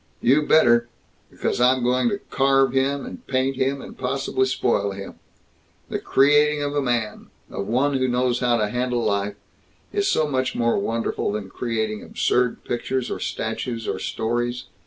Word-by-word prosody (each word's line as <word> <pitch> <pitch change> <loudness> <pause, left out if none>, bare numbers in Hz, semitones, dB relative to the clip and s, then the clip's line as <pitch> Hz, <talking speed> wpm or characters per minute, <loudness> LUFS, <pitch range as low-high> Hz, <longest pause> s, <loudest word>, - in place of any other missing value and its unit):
"You 135 +5 +4
better! 120 -6 +5 0.4
Because - - -2
I'm 130 0 +4
going 125 - +2
to 205 - -1
carve 135 -1 +3
him, 135 +1 0
and - - -10
paint 130 0 0
him, 135 +1 -1
and - - -10
possibly 130 0 -1
spoil 100 -6 0
him. 100 0 -9 0.7
The - - -2
creating 145 +2 +3
of 145 0 -2
a 145 - +2
man 120 -5 -2 0.2
of 100 - -4
one 135 +5 +1
who 130 -1 +1
knows 125 0 +1
how 120 -1 +2
to 105 -2 0
handle 125 +1 -1
life 100 0 0 0.6
is 405 -1 +1
so 155 - +2
much 130 -2 -1
more 115 -2 +1
wonderful 115 0 -1
than 100 -2 -5
creating 110 -3 -2
absurd 125 -1 0
pictures 125 +1 -2
or - - -3
statues 115 +1 -3
or - - -2
stories. 120 +2 -2
125 Hz, 165 wpm, -23 LUFS, 115-135 Hz, 0.7 s, better